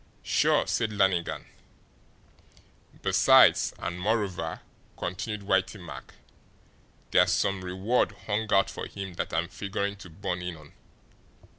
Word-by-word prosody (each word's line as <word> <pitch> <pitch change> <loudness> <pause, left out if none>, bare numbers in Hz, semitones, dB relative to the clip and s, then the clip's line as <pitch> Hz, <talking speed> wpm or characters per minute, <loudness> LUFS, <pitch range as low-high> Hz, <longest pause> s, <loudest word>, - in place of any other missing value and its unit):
"Sure," - - +3
said 110 -1 0
Lannigan. 95 -4 +1 1.6
"Besides, - - +6
and 90 +1 -4
moreover," 100 -2 -1 0.4
continued 105 +3 -4
Whitey 95 +1 +1
Mack, 85 -2 -10 1.0
"there's - - +5
SOME 100 -1 0
reward 95 +7 0
hung 105 0 -1
out 100 0 +4
for - - -6
him 95 -2 -7
that - - -4
I'm 85 +1 0
figuring 100 +1 -3
to 95 - -11
born 90 +1 -4
in 90 -2 -5
on. 75 -2 -16
95 Hz, 120 wpm, -28 LUFS, 90-100 Hz, 1.6 s, Besides